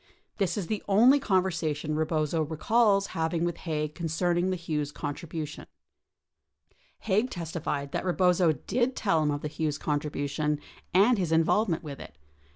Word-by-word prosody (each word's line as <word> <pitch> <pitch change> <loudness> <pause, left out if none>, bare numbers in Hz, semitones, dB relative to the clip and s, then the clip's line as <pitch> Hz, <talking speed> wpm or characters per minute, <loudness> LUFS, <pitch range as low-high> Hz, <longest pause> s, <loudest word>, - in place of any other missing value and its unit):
This 195 +1 0
is 200 - -2
the 215 +3 -2
only 240 +8 +6
conversation 165 - 0
Eebozo 155 0 0
recalls 200 +4 +2
having 165 +1 0
with 175 -1 -2
Haig 150 -2 -3
concerning 175 +2 0
the 185 - 0
Hughes 155 -4 -3
contribution. 150 +1 -6 1.3
48 195 -3 0
Haig 225 +5 +2
testified 160 - -4
that - - -2
Eebozo 180 -5 +2
did 250 +2 0
tell 180 -8 +1
him 150 - +1
of 145 0 -2
the - - -3
Hughes 150 -1 -2
contribution, 150 0 -1 0.3
and 205 +5 +4
his 175 -4 -1
involvement 165 +3 +2
with 145 -3 -7
it. - - -11
165 Hz, 150 wpm, -28 LUFS, 150-190 Hz, 1.3 s, only